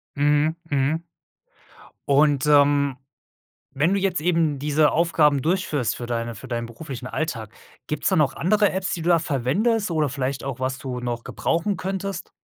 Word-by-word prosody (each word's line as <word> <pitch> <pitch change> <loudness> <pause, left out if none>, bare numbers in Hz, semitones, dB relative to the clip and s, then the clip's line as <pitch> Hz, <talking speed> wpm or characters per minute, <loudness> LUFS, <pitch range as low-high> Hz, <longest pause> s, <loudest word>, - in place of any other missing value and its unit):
Mhm, 145 +2 +2 0.2
mhm. 145 +5 0 1.0
Und, 145 -1 +4
ähm, 145 -2 +4 0.8
wenn 165 +7 +3
du 200 - +1
jetzt 190 -3 0
eben 165 -4 +1
diese 150 +1 +2
Aufgaben 150 -4 +3
durchführst 155 - 0
für 120 - -5
deine 115 0 -3
für 100 - -10
deinen 115 -1 -3
beruflichen 125 +1 -8
Alltag, 115 -9 -4 0.3
gibt's 150 - -2
da - - +2
noch 145 -3 +2
andere 205 +3 +2
Apps, 190 0 -2
die 170 - -4
du 170 +1 +4
verwendest 175 - 0
oder 155 -2 +1
vielleicht 135 0 -3
auch, 135 -2 -4
was 130 0 -1
du 125 -2 -5
noch 120 -1 -3
gebrauchen 170 +5 -1
könntest? 190 +1 -4
150 Hz, 160 wpm, -23 LUFS, 130-170 Hz, 1.0 s, Und